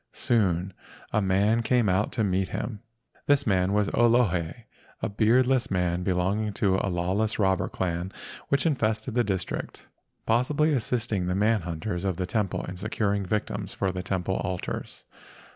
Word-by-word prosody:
Soon 95 -5 +1 0.4
a 105 - +3
man 100 +4 +2
came 120 -1 +2
out 95 +3 +1
to 115 - +1
meet 95 -1 0
him. 105 -4 -4 0.5
This 145 0 +4
man 95 -3 +2
was 105 0 +2
an - - -5
Olohe, 115 -5 +2 0.4
a - - -1
beardless 120 +5 +3
man 90 -1 0
belong¬ 95 +3 +1
ing 105 - -4
to 95 -2 +2
a 100 - -1
lawless 95 +5 0
robber 95 -2 +1
clan 90 0 -2 0.4
which 140 -1 +2
infested 110 -6 0
the 120 +1 +3
district, 95 -4 -3 0.4
possibly 145 +7 +2
assisting 115 -6 -1
the 90 - 0
man 105 +1 +2
hunters 85 +2 -4
of 95 -3 -1
the 90 - -1
temple 100 +1 -1
in 90 - -7
securing 100 -1 -1
victims 100 -1 -2
for 95 -1 0
the 90 0 -4
temple 95 0 -1
altars. 90 -1 -4
100 Hz, 160 wpm, -27 LUFS, 90-115 Hz, 0.5 s, This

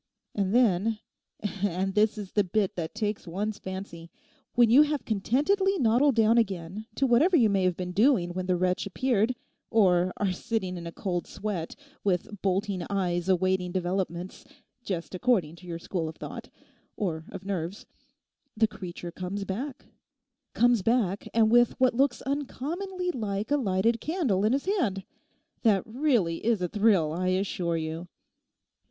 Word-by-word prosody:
And 195 -2 0
then—and 205 -3 -1
this 215 +2 +2
is 200 -3 -6
the 205 - +2
bit 195 +1 0
that 165 +2 -4
takes 210 -3 -2
one's 200 +5 -3
fancy—when 190 +5 -3
you 265 +5 +8
have 300 -1 +1
contentedly 295 - +1
noddled 250 +1 +3
down 225 +1 +5
again 195 0 -3
to 275 - +2
whatever 290 +9 +4
you 225 -6 +4
may 195 -2 +2
have 180 -2 +1
been 180 -1 -4
doing 200 -3 +3
when 185 0 -3
the 185 - +2
wretch 180 +2 0
appeared, 240 +2 +1 0.3
or 185 -5 +3
are 200 -2 +1
sitting 190 -1 -2
in 170 -1 -6
a - - -6
cold 175 -1 -3
sweat, 195 -5 -4 0.3
with 200 +1 -1
bolting 195 0 0
eyes 180 -2 -1
awaiting 185 0 +1
developments, 180 -1 -3 0.4
just 180 -5 -4
according 185 -6 +1
to 180 - -14
your 170 -1 -4
school 165 -1 -3
of 160 - -9
thought, - - -8 0.5
or 165 -6 -2
of 190 0 -9
nerves, 190 0 -4 0.7
the 220 0 +4
creature 175 -4 -7
comes 185 +3 -4
back—comes 245 +1 -2
back; 210 -3 +1
and 220 -1 +3
with 240 0 +4
what 255 -1 +4
looks 255 -1 +1
uncommonly 335 +7 -3
like 210 - -3
a 290 - +4
lighted 225 -1 +1
candle 295 - 0
in 220 - +3
his 275 - 0
hand. 245 - 0 0.6
That 205 -5 +3
really 225 - 0
is 230 -2 +2
a 180 - -1
thrill, 195 -6 +2
I 185 +2 -1
assure 185 -2 0
you. 160 +2 -4
200 Hz, 155 wpm, -28 LUFS, 180-235 Hz, 0.7 s, you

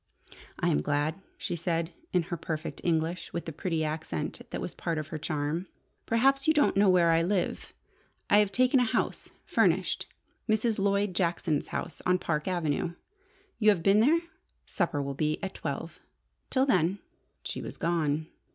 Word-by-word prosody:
"I - - +2
am 75 - +2
glad," 150 - -1 0.2
she - - -3
said, 170 0 -1 0.2
in 180 -2 +2
her 175 +1 -4
perfect 160 -1 -5
English, 170 +1 0
with 170 - -3
the 165 - -4
pretty 160 0 -1
accent 155 - -3
that - - -4
was - - -4
part 165 -1 -2
of 155 -1 -4
her 155 - -4
charm. 155 +3 -2 0.4
"Perhaps 270 +5 +3
you 315 - +5
don't 295 - +4
know 200 0 +5
where 175 -2 +5
I 165 0 +4
live? 180 +2 -1 0.5
I 205 - +6
have 205 -2 +3
taken 255 +4 +4
a - - +4
house, 225 - -1 0.2
furnished: - - +1 0.4
Mrs. 220 0 +2
Lloyd 200 0 +1
Jackson's 170 -4 0
house - - -4
on 180 0 +3
Park 155 -3 -2
Avenue. 170 -2 -1 0.6
You 215 -2 +5
have 185 -6 +3
been 195 +2 +5
there? 305 +9 +4 0.4
Supper 165 -6 -1
will 140 0 -3
be 155 +2 0
at 190 - -3
twelve. - - -5 0.5
Till 265 0 +3
then 185 - +2 0.2
" - - -45
She - - -4
was - - -7
gone. 160 -3 0
175 Hz, 175 wpm, -29 LUFS, 160-200 Hz, 0.6 s, I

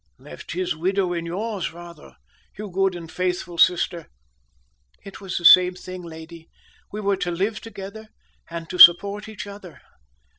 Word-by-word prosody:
"Left - - -11
his 180 -2 -2
widow 185 +2 -1
in 170 -1 -4
yours, 200 +2 -4
rather, 170 -2 -13 0.4
you 210 -1 -7
good 195 0 0
and 165 -2 -9
faithful 180 -2 -3
sister." 175 -2 +2 1.0
"It 195 - -12
was 190 -2 -5
the 175 - -5
same 180 +1 +7
thing, 185 0 -9
lady; 165 0 -12 0.4
we 210 - -6
were 200 -1 0
to 180 - -3
live 195 +5 -2
together, 220 0 -10 0.4
and 165 -1 -7
to 180 - -6
support 200 +5 +7
each 210 -4 -8
other." 200 -4 -12
180 Hz, 155 wpm, -22 LUFS, 170-200 Hz, 1.0 s, same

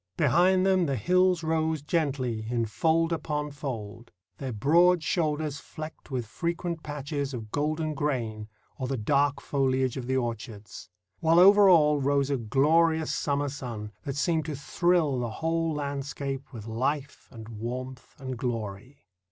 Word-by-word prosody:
Behind 180 +6 +4
them 185 -3 +3
the 140 - 0
hills 180 - +2
rose 160 -2 0
gently 135 -8 -1
in 120 -1 0
fold 165 +9 +1
upon 150 -2 -3
fold, 120 -5 -6 0.3
their 135 -2 -4
broad 165 - +4
shoulders 155 -3 -1
flecked 155 +2 -9
with 125 -4 -2
frequent 170 - -3
patches 145 -2 -4
of 110 -3 -8
golden 155 +1 -1
grain 120 -8 -2 0.3
or 130 - -2
the 135 0 -2
dark 140 +5 +1
foliage 130 -2 0
of 125 -2 -5
the 130 0 +1
orchards; 115 -6 -5 0.3
while 165 0 +3
over 200 +2 +8
all 150 -4 +5
rose 140 0 +1
a 140 - +1
glorious 155 +7 +2
summer 145 -1 0
sun 120 -6 -6
that 140 - -4
seemed 160 +1 0
to 155 -2 -4
thrill 155 -1 +1
the 120 -1 -2
whole 165 +7 -1
landscape 140 -1 -4
with 110 -5 -8
life 135 +5 -3
and 110 -3 -10
warmth 125 +3 -7
and 130 -2 -5
glory. 115 0 -5
140 Hz, 150 wpm, -27 LUFS, 125-160 Hz, 0.3 s, over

